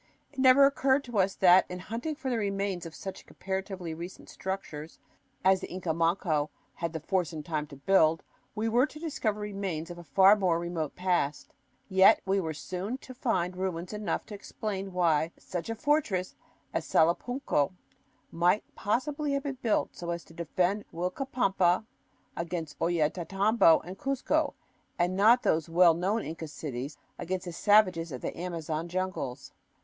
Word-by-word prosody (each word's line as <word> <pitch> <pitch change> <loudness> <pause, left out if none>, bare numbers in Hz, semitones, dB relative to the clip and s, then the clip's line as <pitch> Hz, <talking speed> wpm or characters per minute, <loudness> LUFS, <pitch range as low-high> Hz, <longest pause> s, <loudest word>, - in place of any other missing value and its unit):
It 275 - -9
never 260 +1 +7
occurred 275 0 +2
to 240 -5 -2
us 190 0 +2
that, 185 0 +6
in 180 - -5
hunting 230 - -4
for 270 -3 -4
the 235 - 0
remains 195 -3 -2
of 160 - -11
such 190 - -8
comparatively 190 -3 -4
recent 170 +3 -9
structures 165 -5 -6 0.5
as 190 0 +5
the - - -6
Inca 180 -2 -2
Manco 165 -2 +1 0.2
had 170 -1 -3
the 160 - -3
force 180 +2 -1
and 155 -2 -7
time 155 -3 -2
to 145 - -11
build, 160 +2 +3 0.3
we 220 +1 -1
were 240 +5 +3
to 305 - -12
discover 240 -10 -2
remains 195 -5 -4
of 175 - -8
a - - -9
far 190 +7 +6
more 185 -5 +1
remote 170 -3 -3
past. 175 -6 -1 0.3
Yet 190 +1 +6
we 195 +1 +2
were 160 -4 -3
soon 185 - -4
to 260 - -11
find 185 -8 -1
ruins 185 0 -3
enough 210 0 -2
to 215 - -10
explain 200 -1 -5
why 170 -3 +2
such 175 +3 -5
a 225 - -2
fortress 225 -9 0 0.4
as - - -1
Salapunco 170 - +1 0.6
might 175 +5 +2
possibly 285 +7 -1
have 280 0 -1
been 275 -3 -4
built 225 -3 0
so 170 - -6
as 170 -1 -3
to - - -17
defend 180 +5 0
Uilcapampa 190 0 +1 0.5
against 165 -3 -4
Ollantaytambo 175 +3 +3
and 185 +3 -9
Cuzco 275 -1 0 0.4
and 180 +1 +1
not 225 +6 +5
those 160 0 +1
well 170 0 +6
known 195 +7 0
Inca 160 +1 -6
cities 145 -2 -6 0.2
against 185 +1 -3
the 175 - -5
savages 185 -4 +3
of 130 - -6
the - - -4
Amazon 165 -2 -4
jungles. 175 -8 -4
185 Hz, 165 wpm, -29 LUFS, 165-210 Hz, 0.6 s, never